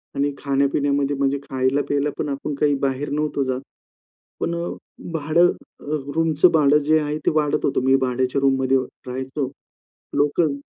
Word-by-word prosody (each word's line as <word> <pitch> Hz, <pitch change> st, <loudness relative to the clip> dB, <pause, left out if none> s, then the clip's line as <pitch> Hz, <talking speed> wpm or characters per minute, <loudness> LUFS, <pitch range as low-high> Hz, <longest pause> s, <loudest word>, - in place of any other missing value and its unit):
आणि 140 Hz, +1 st, 0 dB
खाण्यापिण्यामध्ये 140 Hz, 0 st, +1 dB
म्हणजे 140 Hz, 0 st, +1 dB
खायला-प्यायला 140 Hz, +2 st, 0 dB
पण 150 Hz, -, -1 dB
आपण 140 Hz, +1 st, -3 dB
काही 145 Hz, -1 st, +4 dB
बाहेर 135 Hz, +2 st, -2 dB
नव्हतो 150 Hz, -1 st, 0 dB
जात. 130 Hz, 0 st, -2 dB, 0.8 s
पण 170 Hz, -, -1 dB
अ, 170 Hz, +1 st, -3 dB, 0.5 s
भाडं 160 Hz, +3 st, +3 dB, 0.6 s
रूमच 160 Hz, 0 st, +2 dB
भाडं 150 Hz, -1 st, +5 dB
जे 155 Hz, +1 st, +4 dB
आहे, 150 Hz, 0 st, -2 dB
ते -, -, 0 dB
वाढत 150 Hz, -2 st, +1 dB
होतं. 135 Hz, -, +1 dB
मी 135 Hz, 0 st, +5 dB
भाड्याच्या 130 Hz, +1 st, 0 dB
रूममध्ये 135 Hz, -1 st, +3 dB, 0.3 s
राहायचो. 130 Hz, +2 st, -3 dB, 0.7 s
लोकल 145 Hz, +1 st, +2 dB
140 Hz, 140 wpm, -22 LUFS, 135-150 Hz, 0.8 s, भाडं